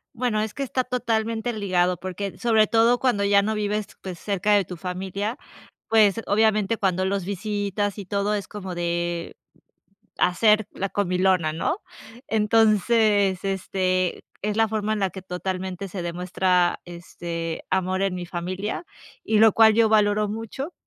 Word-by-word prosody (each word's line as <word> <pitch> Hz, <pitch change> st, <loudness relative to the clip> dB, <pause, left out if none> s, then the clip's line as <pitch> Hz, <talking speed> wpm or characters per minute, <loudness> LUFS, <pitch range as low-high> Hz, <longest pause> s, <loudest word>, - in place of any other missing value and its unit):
Bueno 235 Hz, -3 st, 0 dB
es 215 Hz, -1 st, -3 dB
que 280 Hz, -, -6 dB
está 260 Hz, -1 st, -1 dB
totalmente 230 Hz, -2 st, -1 dB
ligado, 180 Hz, -4 st, +1 dB
porque, 190 Hz, +2 st, -5 dB
sobre 220 Hz, -3 st, +3 dB
todo 230 Hz, +3 st, +3 dB
cuando 245 Hz, -6 st, +1 dB
ya 200 Hz, 0 st, +4 dB
no 215 Hz, +2 st, -1 dB
vives, 210 Hz, 0 st, -1 dB
pues, 185 Hz, -3 st, -7 dB
cerca 205 Hz, 0 st, 0 dB
de 205 Hz, -1 st, +4 dB
tu 180 Hz, 0 st, -8 dB
familia, 190 Hz, +5 st, -4 dB, 0.5 s
pues 220 Hz, -1 st, +4 dB
obviamente 215 Hz, 0 st, +2 dB
cuando 185 Hz, -2 st, 0 dB
los 195 Hz, -1 st, -1 dB
visitas 205 Hz, +1 st, -2 dB
y 200 Hz, -, -6 dB
todo, 200 Hz, +2 st, 0 dB
es 205 Hz, -, -4 dB
como 190 Hz, -3 st, -7 dB
de 175 Hz, 0 st, -2 dB, 0.8 s
hacer 210 Hz, +3 st, +3 dB
la 195 Hz, -, -3 dB
comilona, 185 Hz, -4 st, +1 dB
¿no?, 165 Hz, -, -1 dB, 0.5 s
entonces, 215 Hz, -2 st, +3 dB
este, 185 Hz, -1 st, -1 dB, 0.2 s
es 210 Hz, +1 st, -2 dB
la 225 Hz, 0 st, +4 dB
forma 215 Hz, 0 st, -1 dB
en 215 Hz, -, -2 dB
la 195 Hz, -2 st, 0 dB
que 190 Hz, -, -8 dB
totalmente 185 Hz, +1 st, -4 dB
se 185 Hz, 0 st, -5 dB
demuestra, 180 Hz, +1 st, +1 dB
este, 170 Hz, -1 st, -6 dB
amor 185 Hz, 0 st, 0 dB
en 195 Hz, -2 st, 0 dB
mi 180 Hz, -1 st, -5 dB
familia, 185 Hz, -, -4 dB, 0.4 s
y 220 Hz, -, +1 dB
lo 220 Hz, +1 st, +7 dB
cual 220 Hz, -1 st, +6 dB
yo 225 Hz, -1 st, +4 dB
valoro 210 Hz, -1 st, +3 dB
mucho, 225 Hz, -, -5 dB
200 Hz, 155 wpm, -24 LUFS, 185-215 Hz, 0.8 s, lo